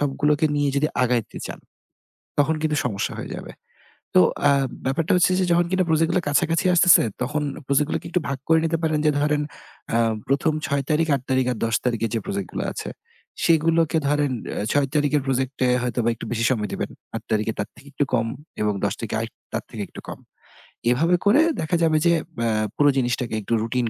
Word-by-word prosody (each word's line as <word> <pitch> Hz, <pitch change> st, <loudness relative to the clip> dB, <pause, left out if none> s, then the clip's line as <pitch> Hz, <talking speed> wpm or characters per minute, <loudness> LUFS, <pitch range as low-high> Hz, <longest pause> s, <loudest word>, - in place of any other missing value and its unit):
সবগুলোকে 145 Hz, +2 st, +2 dB
নিয়ে 145 Hz, -1 st, +2 dB
যদি 150 Hz, +2 st, +2 dB
আগাইতে 120 Hz, -3 st, 0 dB
চান, -, -, -7 dB, 0.8 s
তখন 155 Hz, +2 st, +3 dB
কিন্তু 155 Hz, -1 st, 0 dB
সমস্যা 100 Hz, -5 st, -2 dB
হয়ে -, -, -6 dB
যাবে। -, -, -8 dB, 0.6 s
তো -, -, +8 dB, 0.3 s
আ -, -, +5 dB, 0.3 s
ব্যাপারটা 155 Hz, +8 st, 0 dB
হচ্ছে 180 Hz, +1 st, +4 dB
যে 185 Hz, -, +2 dB
যখন 175 Hz, 0 st, +4 dB
কিনা 185 Hz, 0 st, +2 dB
project 160 Hz, +1 st, +3 dB
গুলা 180 Hz, -, +1 dB
কাছাকাছি 165 Hz, +3 st, +1 dB
আসতেছে 180 Hz, 0 st, +7 dB, 0.2 s
তখন 150 Hz, +4 st, -1 dB, 0.3 s
project 140 Hz, +1 st, +3 dB
গুলোকে -, -, -3 dB
একটু 180 Hz, -, +1 dB
ভাগ 135 Hz, -, -2 dB
করে 160 Hz, 0 st, +6 dB
নিতে 165 Hz, 0 st, 0 dB
পারেন। 155 Hz, -1 st, +1 dB
যে 150 Hz, -, +5 dB
ধরেন 150 Hz, 0 st, +1 dB, 0.5 s
আ -, -, +4 dB, 0.3 s
১ম 145 Hz, +4 st, +1 dB
৬ 140 Hz, -1 st, 0 dB
তারিখ, 160 Hz, +1 st, +2 dB
৮ 135 Hz, -, -4 dB
তারিখ 130 Hz, -1 st, +2 dB
আর -, -, -9 dB
১০ 115 Hz, 0 st, 0 dB
তারিখে 115 Hz, -2 st, 0 dB
যে 115 Hz, -, +1 dB
project 100 Hz, -2 st, -3 dB
গুলা -, -, -2 dB
আছে -, -, -5 dB, 0.6 s
সেগুলোকে 165 Hz, 0 st, +3 dB
ধরেন 145 Hz, -1 st, +1 dB, 0.3 s
এ -, -, -2 dB
৬ 145 Hz, -1 st, +2 dB
তারিখের 150 Hz, 0 st, +2 dB
project 130 Hz, 0 st, 0 dB
এ -, -, +2 dB
হয়তোবা 120 Hz, -1 st, 0 dB
একটু -, -, -8 dB
বেশি 115 Hz, -1 st, 0 dB
সময় 105 Hz, -5 st, -1 dB
দিবেন, -, -, -3 dB, 0.2 s
৮ -, -, -3 dB
তারিখের 110 Hz, +1 st, 0 dB
তার 105 Hz, -, -2 dB
থেকে 140 Hz, -, -17 dB
একটু 145 Hz, -, +1 dB
কম 115 Hz, -2 st, +2 dB, 0.3 s
এবং 105 Hz, -1 st, +1 dB
১০ 100 Hz, -, 0 dB
তারিখের 110 Hz, -1 st, -2 dB
আর 115 Hz, -, -3 dB, 0.3 s
তার -, -, -2 dB
থেকে -, -, -4 dB
একটু -, -, -11 dB
কম। -, -, -7 dB, 0.7 s
এভাবে 165 Hz, +8 st, +3 dB
করে 235 Hz, +10 st, +6 dB, 0.2 s
দেখা 155 Hz, +2 st, 0 dB
যাবে 155 Hz, -1 st, +3 dB
যে 170 Hz, -, +5 dB
এ্যা 135 Hz, -8 st, -3 dB, 0.3 s
পুরো 145 Hz, 0 st, +4 dB
জিনিসটাকে 120 Hz, -2 st, -1 dB
একটু 115 Hz, -, -3 dB
routine 120 Hz, 0 st, -1 dB
145 Hz, 200 wpm, -23 LUFS, 120-160 Hz, 0.8 s, তো